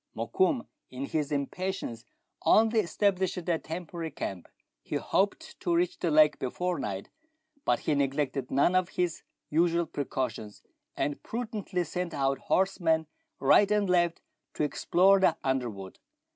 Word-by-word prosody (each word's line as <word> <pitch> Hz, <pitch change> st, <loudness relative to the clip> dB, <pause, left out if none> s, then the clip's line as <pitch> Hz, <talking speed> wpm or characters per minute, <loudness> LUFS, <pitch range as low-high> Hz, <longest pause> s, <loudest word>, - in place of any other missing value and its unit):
Mokoum, 330 Hz, -10 st, +1 dB, 0.2 s
in 130 Hz, +2 st, -5 dB
his 150 Hz, 0 st, -1 dB
impa 140 Hz, -2 st, -1 dB, 0.2 s
tience, 115 Hz, -, -5 dB, 0.4 s
only 225 Hz, +1 st, +5 dB
established 190 Hz, -1 st, +1 dB
a 170 Hz, -2 st, -1 dB
temporary 165 Hz, 0 st, -5 dB
camp; 95 Hz, -, -5 dB, 0.3 s
he -, -, -5 dB
hoped 200 Hz, +1 st, -1 dB
to 175 Hz, -2 st, 0 dB
reach 175 Hz, +1 st, 0 dB
the 175 Hz, -, 0 dB
lake 150 Hz, -1 st, +5 dB
before 175 Hz, +6 st, -2 dB
night; 100 Hz, -5 st, -4 dB, 0.6 s
but -, -, +2 dB
he -, -, 0 dB
neglected 140 Hz, -1 st, -1 dB
none 140 Hz, +6 st, +3 dB
of 185 Hz, -1 st, +2 dB
his 175 Hz, -2 st, -1 dB, 0.3 s
usual 170 Hz, +2 st, +2 dB
precautions, 125 Hz, -8 st, -4 dB, 0.3 s
and 145 Hz, -, -1 dB
prudently 215 Hz, -6 st, -3 dB
sent 175 Hz, +1 st, -4 dB
out 135 Hz, -1 st, +1 dB
horsemen 170 Hz, -4 st, +1 dB, 0.3 s
right 195 Hz, +9 st, +5 dB
and 205 Hz, -3 st, +2 dB
left 175 Hz, -2 st, +2 dB, 0.3 s
to -, -, 0 dB
explore 185 Hz, +6 st, +4 dB
the 190 Hz, -, +3 dB
underwood. 120 Hz, -8 st, -3 dB
165 Hz, 140 wpm, -29 LUFS, 140-185 Hz, 0.6 s, only